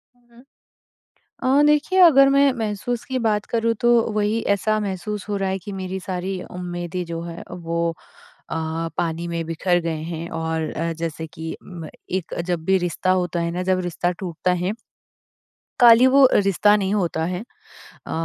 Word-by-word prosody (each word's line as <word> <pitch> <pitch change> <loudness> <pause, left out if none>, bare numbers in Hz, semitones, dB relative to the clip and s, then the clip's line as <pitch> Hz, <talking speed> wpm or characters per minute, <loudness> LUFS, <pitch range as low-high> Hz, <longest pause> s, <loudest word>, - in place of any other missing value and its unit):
हुँ, 245 - -32
हुँ। 240 +2 -18 1.2
अ, - - +6
देखिए 300 +5 +2
अगर 275 -6 +8
मैं 275 0 +4
महसूस 225 +1 -3
की 260 -1 -2
बात 215 -3 0
करूँ 230 0 +1
तो 240 - +3 0.2
वही 210 +2 0
ऐसा 215 +2 0
महसूस 205 +1 -4
हो 205 - -1
रहा 195 -1 -1
है 190 - -1
कि 195 +2 -8
मेरी 190 0 -4
सारी 185 0 -4
उम्मीदें 175 0 -4
जो 165 0 -4
हैं, 170 0 -7
वो 170 -1 -2 0.6
अ, - - -2 0.4
पानी 170 0 -2
में 170 -1 -3
बिखर 175 +2 +1
गए 165 -1 -2
हैं 165 +1 -5
और 160 -1 -2
अ, 165 +1 -2
जैसे 160 0 -5
कि 160 +1 -7
म 170 -4 -9 0.2
एक 185 -2 -3
जब 175 -3 -2
भी 190 +2 +3
रिश्ता 180 +1 -1
होता 180 -2 0
है 170 - -1
ना 180 +2 -3
जब 185 0 +1
रिश्ता 175 0 -1
टूटता 180 0 -1
है 190 - 0 1.1
काली 240 +1 +8
वो 270 0 +7
रिश्ता 205 +1 +4
नहीं 195 0 -1
होता 170 -5 0
है 180 +4 -3 0.6
अ, - - -5
185 Hz, 175 wpm, -22 LUFS, 170-210 Hz, 1.2 s, अगर